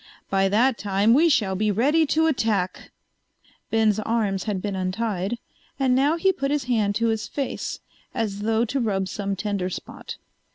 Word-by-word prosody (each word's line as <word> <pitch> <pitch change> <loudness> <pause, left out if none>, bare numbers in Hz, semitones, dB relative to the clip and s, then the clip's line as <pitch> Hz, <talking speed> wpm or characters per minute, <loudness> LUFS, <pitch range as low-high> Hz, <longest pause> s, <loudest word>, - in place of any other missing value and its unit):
By 195 0 +3
that 230 +5 +2
time 205 +2 +2
we 325 +6 +5
shall 210 -10 +2
be 210 +2 +1
ready 290 +10 +3
to 320 +3 +2
attack." 220 - 0 0.8
Ben's 220 -2 +2
arms 215 -4 -1
had 205 -4 -1
been 200 +1 -3
untied, 190 +2 -2 0.4
and 265 -2 +3
now 285 +5 +3
he 380 +3 +3
put 275 -4 -2
his 290 -1 0
hand 220 -5 +1
to 230 +1 +1
his 220 -2 -1
face, 275 -2 -4 0.3
as 205 -3 -2
though 225 +2 +1
to 270 +4 -2
rub 195 -5 0
some 200 0 -3
tender 195 -2 -2
spot. - - -8
220 Hz, 170 wpm, -24 LUFS, 200-255 Hz, 0.8 s, we